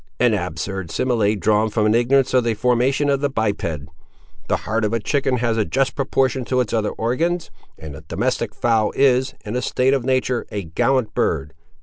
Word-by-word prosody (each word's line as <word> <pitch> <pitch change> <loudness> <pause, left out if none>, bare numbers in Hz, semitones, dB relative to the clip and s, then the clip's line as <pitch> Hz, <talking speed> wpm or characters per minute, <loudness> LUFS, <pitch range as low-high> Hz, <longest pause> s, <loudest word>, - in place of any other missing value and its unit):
"An 120 -2 +3
absurd 95 -1 -3
simile 110 +1 +1
drawn 105 +2 +2
from 110 0 0
an 105 - +3
ignorance 130 +3 +2
of 130 -1 +4
the 115 -1 0
formation 125 +5 +1
of 140 -1 +2
the 145 - +1
biped. 110 -5 -1 0.8
The - - +1
heart 110 +1 -1
of 105 +1 0
a 115 - +1
chicken 135 +3 0
has 115 -2 0
a 110 - +2
just 135 +5 0
proportion 135 -1 0
to 130 +1 0
its 125 -5 -1
other 110 -2 +1
organs, 165 +10 -1 0.3
and 80 -2 -9
the 70 - -10
domestic - - -2
fowl 115 -3 +1
is, 130 -1 +2
in 105 +3 -4
a 125 - 0
state 130 +1 +1
of 135 -3 0
nature, 130 -1 0
a 100 -1 -3
gallant 110 +7 0
bird. 75 -6 -1
120 Hz, 200 wpm, -21 LUFS, 105-130 Hz, 0.8 s, of